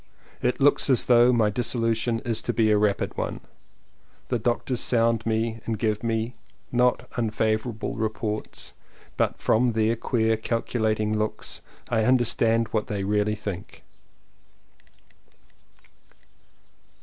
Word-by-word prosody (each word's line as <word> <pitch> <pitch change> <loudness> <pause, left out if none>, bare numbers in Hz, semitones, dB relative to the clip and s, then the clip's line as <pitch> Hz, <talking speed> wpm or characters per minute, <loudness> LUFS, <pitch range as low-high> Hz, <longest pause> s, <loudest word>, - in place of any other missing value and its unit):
It 125 - 0
looks 145 +1 +4
as 130 - +4
though 120 0 +6
my 110 -4 +3
dissolution 115 0 0
is 115 -4 -1
to - - -2
be 110 -2 +3
a 105 - +4
rapid 105 -1 0
one. - - -3 0.9
The 120 - 0
doctors 120 +2 -1
sound 115 -2 +1
me 115 0 -1
and 115 -1 -1
give 105 -1 0 0.7
not 125 0 +2
unfavorable 110 0 -1
reports, 110 -1 -4 0.4
but - - 0
from 120 +1 +2
their 110 +1 +2
queer, 110 -1 +1
calculating 110 -2 -1
looks, 105 0 -3 0.3
I 110 -2 +2
understand 115 -2 +2
what 110 -2 -1
they 100 -2 -3
really 105 +1 +1
think. 100 -4 -7
115 Hz, 115 wpm, -25 LUFS, 110-120 Hz, 0.9 s, though